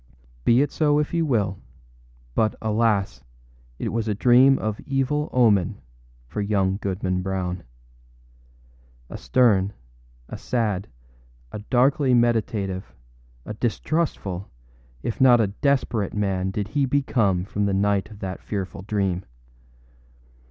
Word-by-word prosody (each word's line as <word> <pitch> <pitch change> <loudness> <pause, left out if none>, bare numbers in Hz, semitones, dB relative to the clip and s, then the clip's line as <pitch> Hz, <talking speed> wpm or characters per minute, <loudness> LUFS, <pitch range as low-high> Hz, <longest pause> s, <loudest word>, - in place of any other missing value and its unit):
Be 120 +4 +5
it 145 - -3
so 150 -2 +2
if 150 +2 -1
you 165 -1 +1
will; 100 -8 0 0.7
but, 110 +6 +1
alas! 105 - 0 0.6
it - - -3
was 115 0 -2
a 105 - 0
dream 125 +5 +5
of 110 -1 -3
evil 140 +3 0
omen 105 -8 +3 0.5
for 105 - -4
young 100 -2 +1
Goodman 95 -2 -2
Brown. 90 -1 -3 1.5
A - - -5
stern, 105 -6 +3 0.5
a - - -8
sad, 105 -5 -1 0.6
a - - -6
darkly 130 +4 +2
meditative, 110 -5 0 0.5
a - - -5
distrustful, 110 - -2 0.5
if 115 - -3
not 125 -2 +7
a 110 - +4 0.2
desperate 125 -8 0
man 95 -2 0
did 100 +1 -3
he 140 +3 +1
become 115 -9 +1
from 105 0 -1
the - - 0
night 100 0 +1
of 105 -2 -13
that 95 -1 -5
fearful 95 -3 -5
dream. 95 -3 -1
105 Hz, 125 wpm, -24 LUFS, 95-125 Hz, 1.5 s, not